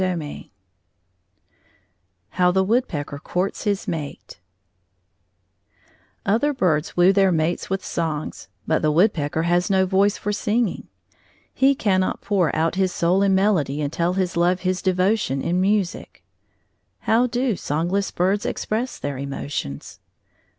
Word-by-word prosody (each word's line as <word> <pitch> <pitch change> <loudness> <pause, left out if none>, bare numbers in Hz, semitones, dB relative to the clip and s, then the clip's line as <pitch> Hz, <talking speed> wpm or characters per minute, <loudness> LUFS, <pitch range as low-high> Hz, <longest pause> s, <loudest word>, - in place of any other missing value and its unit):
III 170 -5 -4 1.8
HOW 180 +7 +2
THE 190 +1 +2
WOODPECKER 185 - -1
COURTS 180 +8 -3
HIS 205 -1 -1
MATE 145 - -6 1.9
Other 270 +8 +1
birds 165 - 0
woo 180 +2 +6
their 195 -1 +4
mates 165 +1 -1
with 195 0 -2
songs, 160 -3 -3 0.2
but 160 - +1
the 155 - +2
woodpecker 160 -2 +1
has 175 +1 +1
no 190 -1 +3
voice 195 +2 +2
for 210 - -3
singing. 215 0 -1 0.7
He 275 +1 +3
cannot 185 -6 0
pour 185 -7 +1
out 165 +1 +1
his 190 -1 +1
soul 175 +3 +1
in 195 -1 +3
melody 185 -8 +1
and 145 0 -2
tell 170 +1 0
his 185 -2 -1
love 175 +2 +2
his 185 0 -1
devotion 185 -5 +1
in 175 +5 0
music. 195 -2 -1 0.8
How 235 +3 +3
do 245 -2 0
songless 175 +6 -1
birds 190 +3 0
express 235 +4 -3
their 140 -2 -4
emotions? 140 - -5
185 Hz, 130 wpm, -22 LUFS, 160-200 Hz, 1.9 s, woo